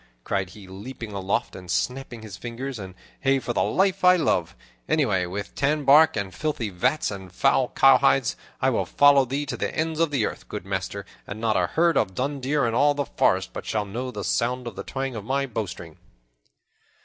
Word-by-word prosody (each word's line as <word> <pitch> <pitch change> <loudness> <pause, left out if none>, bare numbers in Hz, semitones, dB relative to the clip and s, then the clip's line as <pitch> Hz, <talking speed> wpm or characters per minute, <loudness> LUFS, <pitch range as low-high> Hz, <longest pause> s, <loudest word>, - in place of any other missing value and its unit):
cried 95 +3 -1
he, 100 0 -13
leaping 110 +4 -8
aloft 100 +4 -2
and 90 -1 -10
snapping 125 0 -2
his 105 -4 -8
fingers, 120 +5 -6
"and 95 -2 -8 0.2
hey 135 0 +2
for 120 -2 -3
the - - +1
life 195 0 +1
I 180 0 +7
love! 90 - 0 0.3
Away 105 - +2
with 100 +3 -5
tanbark 145 0 +4
and 100 -2 -3
filthy 115 - -2
vats 95 +12 0
and 95 -2 -8
foul 135 +5 +2
cowhides! 135 -1 +4 0.2
I - - +2
will - - -1
follow 145 -1 +5
thee 140 +4 -2
to - - -4
the - - -2
ends 160 0 -1
of 165 -1 +3
the 135 -7 +1
earth, - - -6
good - - -6
master, - - -4 0.2
and 100 - -6
not 110 -1 +1
a 90 -1 +2
herd 170 - +2
of 95 -3 0
dun 140 +2 -2
deer 140 +1 +1
in 115 - 0
all 145 +4 +3
the 145 -1 -1
forest 95 -5 +1
but - - -7
shall 105 -1 -1
know 120 +6 -4
the 105 -5 -6
sound 125 +4 0
of 120 - -6
the - - -5
twang 135 -2 -4
of 105 - -5
my 135 +4 0
bowstring." 90 - -6
125 Hz, 205 wpm, -25 LUFS, 100-140 Hz, 0.3 s, I